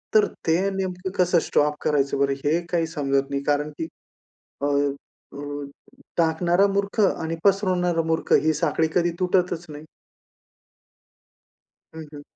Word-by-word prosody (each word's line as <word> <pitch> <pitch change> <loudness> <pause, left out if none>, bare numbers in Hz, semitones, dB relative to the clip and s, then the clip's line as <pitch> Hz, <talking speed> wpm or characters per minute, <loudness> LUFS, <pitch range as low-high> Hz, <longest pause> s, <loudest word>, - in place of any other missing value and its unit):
तर 215 -1 +7 0.2
ते 165 +2 +3 0.2
नेमकं 185 -1 -3
कसं 180 -1 +4
स्टॉप 150 0 +2
करायचं 140 -2 +1
बरं, 140 0 +2
हे 160 +4 +3
काही 165 -2 0
समजत 140 -3 -1
नाही 140 0 -2
कारण, 145 +1 0
की 160 - -2 0.8
अ, - - +1
अ, 140 0 -3 0.8
टाकणारा 170 +3 +3
मूर्ख 200 +2 -1
आणि 165 -5 +1
पसरवणारा 185 -4 +2
मूर्ख 160 0 -1
ही 155 - +3
साखळी 160 0 +1
कधी 175 -1 +2
तुटतच 180 -2 +1
नाही. 150 +1 -9 2.1
हं, 160 - -7
हं. 145 - -8
165 Hz, 130 wpm, -24 LUFS, 145-180 Hz, 2.1 s, तर